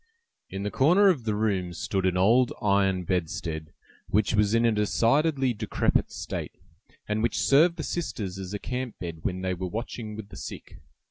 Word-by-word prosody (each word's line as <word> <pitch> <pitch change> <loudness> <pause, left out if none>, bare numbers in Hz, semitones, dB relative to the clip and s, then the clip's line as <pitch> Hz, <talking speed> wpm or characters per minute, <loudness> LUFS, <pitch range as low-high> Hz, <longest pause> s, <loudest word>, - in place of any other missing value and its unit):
In 95 +1 -5
the 105 - -2
corner 180 +9 +5
of 140 -11 0
the 105 -2 0
room 95 -5 0
stood 95 +2 -1
an 90 0 +1
old 115 +7 +4
iron 100 -3 +2
bedstead, 80 -3 -3 0.4
which 105 +1 +1
was 105 +1 +3
in 115 +1 +3
a 115 - +4
decidedly 130 +6 +2
decrepit 110 -1 0
state, - - -5 0.5
and 105 0 -1
which 115 - 0
served 160 +5 +4
the 155 - -3
sisters 105 - -4
as 95 -1 -6
a 105 - -2
camp 125 +2 -4
bed 85 -3 -6
when 90 +2 -3
they 95 0 0
were 90 +1 -4
watching 110 +1 -5
with 105 -1 -8
the - - -11
sick. - - -8
105 Hz, 185 wpm, -27 LUFS, 95-120 Hz, 0.5 s, corner